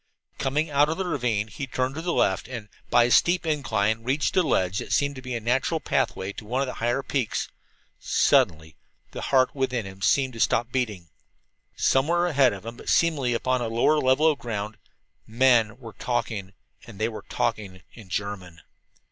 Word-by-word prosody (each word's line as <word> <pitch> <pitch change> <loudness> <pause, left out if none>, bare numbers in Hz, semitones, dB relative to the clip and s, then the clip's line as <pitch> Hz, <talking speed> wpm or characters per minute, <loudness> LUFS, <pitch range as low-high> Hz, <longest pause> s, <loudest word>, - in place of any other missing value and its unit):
Coming 150 +4 0
out 145 +1 +4
of 160 - -2
the 190 - -2
ravine, 125 - -1
he 125 +7 -6
turned 130 +1 -1
to 160 - -5
the 175 +1 -2
left 95 - +1
and, 115 -4 -7 0.2
by 120 - +5
a 120 - +1
steep 175 +5 +4
incline, 115 -8 0
reached 135 +5 0
a 185 - +5
ledge 95 - +1
that - - -7
seemed 140 0 +1
to 130 - -8
be 125 -1 -5
a - - -2
natural 130 +8 0
pathway 95 -8 -1
to - - -9
one 125 +5 -2
of 140 - +1
the 125 - -5
higher 120 +4 0
peaks. 130 -3 -2 0.5
Suddenly 80 0 +2 0.4
the - - -6
heart 130 -2 +2
within 130 -5 -1
him 95 0 -10
seemed 130 +4 +2
to 115 - -9
stop 120 +2 +1
beating. 105 -10 -2 0.7
Somewhere 170 +6 +2
ahead 140 -7 +4
of 100 0 -8
him, 115 +1 -7
but - - -8
seemingly 140 -8 +2
upon 130 +1 0
a 120 - -1
lower 120 +7 +2
level 130 +3 +3
of 155 -3 +3
ground, 105 -2 -4 0.5
men 115 -1 +3
were 115 -4 -11
talking! 110 -5 -3 0.3
And 115 -4 -11
they 110 +2 0
were 110 -2 -8
talking 95 -4 -2
in 110 -5 -14
German! 95 -4 -5
120 Hz, 190 wpm, -25 LUFS, 105-140 Hz, 0.7 s, by